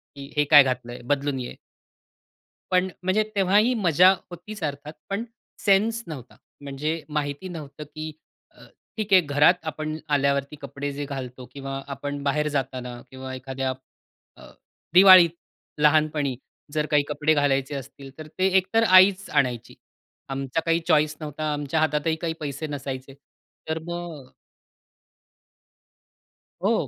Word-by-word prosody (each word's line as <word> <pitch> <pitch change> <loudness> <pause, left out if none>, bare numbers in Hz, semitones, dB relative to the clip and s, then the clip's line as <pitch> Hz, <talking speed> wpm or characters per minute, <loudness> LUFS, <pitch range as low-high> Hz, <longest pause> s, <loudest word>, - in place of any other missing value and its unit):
की 140 0 -10
हे 150 - +5
काय 145 -2 +10
घातलंय? 120 -2 -4
बदलून 140 -1 0
ये. 125 - -6 1.2
पण 185 +1 +2
म्हणजे, 195 +4 +2
तेव्हाही 205 +5 +3
मजा 180 -3 +5 0.2
होतीच 180 +5 -9
अर्थात 145 +1 -4 0.2
पण 200 +4 -2 0.4
सेन्स 220 +3 +2
नव्हता. 135 -6 -9 0.3
म्हणजे 150 +3 -3
माहिती 145 +3 -3
नव्हतं 150 -3 -8
की 155 0 -5 0.4
अ, - - -18 0.3
ठीक 215 -2 -3
आहे 185 - +8
घरात 145 +3 +4
आपण 155 0 -4 0.2
आल्यावरती 140 +1 0
कपडे 140 0 -5
जे 145 +1 -4
घालतो 130 -2 -7
किंवा 135 -1 -6
आपण 145 +1 -5
बाहेर 150 +2 +1
जाताना 125 -2 -3
किंवा 130 0 -7
एखाद्या 130 0 -3 0.6
अ, - - -14 0.4
दिवाळीत 185 -2 +9 0.5
लहानपणी 150 -3 +2 0.4
जर 150 0 0
काही 145 -1 +4
कपडे 150 +1 +1
घालायचे 140 -1 +1
असतील, 135 0 -9
तर 155 -1 -9
ते 190 - +4
एकतर 190 +5 +2
आईच 185 +1 +6
आणायची. 125 -5 -1 0.5
आमचा 135 +3 -2
काही 165 0 +2
चॉईस 150 -2 +3
नव्हता, 150 0 -3
आमच्या 145 +2 -1
हातातही 155 +1 +1
काही 165 0 -3
पैसे 145 +1 -4
नसायचे. 135 -2 -6 0.5
तर 160 +1 -2
मग 170 -6 -7 2.3
हो - - +3
150 Hz, 130 wpm, -24 LUFS, 140-170 Hz, 2.3 s, काय